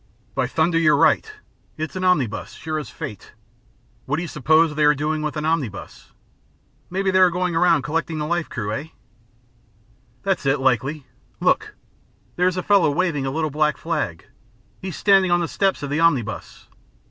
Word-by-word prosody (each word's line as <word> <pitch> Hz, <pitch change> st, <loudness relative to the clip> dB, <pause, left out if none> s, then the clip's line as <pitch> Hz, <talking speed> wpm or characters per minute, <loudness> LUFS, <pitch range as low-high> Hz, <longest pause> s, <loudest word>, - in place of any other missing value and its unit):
"By -, -, 0 dB
thunder, 165 Hz, +1 st, +1 dB
you're 155 Hz, -3 st, +4 dB
right. 165 Hz, -, +3 dB, 0.5 s
It's 155 Hz, +3 st, -5 dB
an 185 Hz, -, -3 dB
omnibus, 145 Hz, -, 0 dB
sure 155 Hz, -1 st, -4 dB
as 150 Hz, -, -7 dB
fate. 105 Hz, -, -8 dB, 0.7 s
What 140 Hz, -, 0 dB
do 170 Hz, -, -2 dB
you -, -, -5 dB
suppose 155 Hz, +2 st, +3 dB
they 150 Hz, 0 st, +2 dB
are 150 Hz, 0 st, +5 dB
doing 155 Hz, +2 st, -1 dB
with 155 Hz, 0 st, -3 dB
an 150 Hz, -, -2 dB
omnibus? 145 Hz, -11 st, -3 dB, 0.8 s
Maybe 190 Hz, +1 st, 0 dB
they 185 Hz, -, +3 dB
are 185 Hz, -1 st, +7 dB
going 180 Hz, 0 st, -1 dB
around 165 Hz, -5 st, +3 dB
collecting 160 Hz, +3 st, -2 dB
the 150 Hz, -, -2 dB
life 170 Hz, +1 st, -1 dB
crew, 105 Hz, -4 st, -4 dB
hey?" 145 Hz, +9 st, -5 dB, 1.3 s
"That's 190 Hz, -7 st, -1 dB
it, 135 Hz, +1 st, +2 dB
likely. 135 Hz, +3 st, 0 dB, 0.3 s
Look! -, -, +1 dB, 0.6 s
There's 180 Hz, +1 st, +1 dB
a 180 Hz, -, -2 dB
fellow 195 Hz, -6 st, +4 dB
waving 150 Hz, -3 st, 0 dB
a -, -, -1 dB
little 155 Hz, +1 st, -1 dB
black 150 Hz, +1 st, +1 dB
flag. -, -, -3 dB, 0.6 s
He's 190 Hz, -2 st, -5 dB
standing 195 Hz, -2 st, +4 dB
on 175 Hz, 0 st, +3 dB
the 170 Hz, -, -1 dB
steps 195 Hz, -2 st, 0 dB
of 140 Hz, -, -4 dB
the 150 Hz, -, 0 dB
omnibus. 135 Hz, -10 st, 0 dB
155 Hz, 175 wpm, -22 LUFS, 145-175 Hz, 1.3 s, are